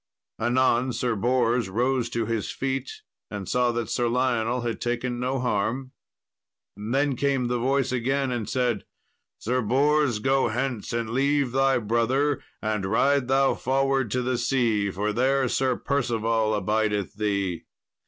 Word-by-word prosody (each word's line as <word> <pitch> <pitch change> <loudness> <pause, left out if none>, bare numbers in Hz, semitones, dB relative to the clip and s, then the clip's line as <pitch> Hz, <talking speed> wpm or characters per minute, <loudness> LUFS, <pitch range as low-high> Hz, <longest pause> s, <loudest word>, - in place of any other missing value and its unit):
Anon 125 +1 +2
Sir 120 -1 -1
Bors 120 0 +1
rose 120 +3 0
to 115 -1 -1
his 115 -1 -2
feet, 135 -1 -3 0.4
and 100 -2 -6
saw 125 -1 +2
that 115 -1 -2
Sir 120 +1 0
Lionel 120 -1 0
had 115 -1 -3
taken 120 0 -2
no 130 +2 -1
harm. 125 +3 -1 0.8
Then 135 +7 0
came 135 -1 0
the 120 0 -1
voice 135 +2 +1
again, 130 +2 0
and 120 -4 -3
said, 125 -5 0 0.5
"Sir 125 +3 -1
Bors, 140 +2 +2
go 135 +4 +2
hence 125 -1 -3
and 115 -1 -2
leave 140 +1 +1
thy 135 +1 +3
brother, 120 +5 +1 0.2
and 110 -2 -1
ride 130 +5 +2
thou 135 +1 +3
forward 135 -1 0
to 125 +3 -1
the 125 -1 -1
sea, 120 -5 +1
for 105 +2 -2
there 130 +3 +2
Sir 130 +1 +1
Percival 115 -6 0
abideth 105 0 0
thee." 100 -4 -2
125 Hz, 145 wpm, -25 LUFS, 115-135 Hz, 0.8 s, thy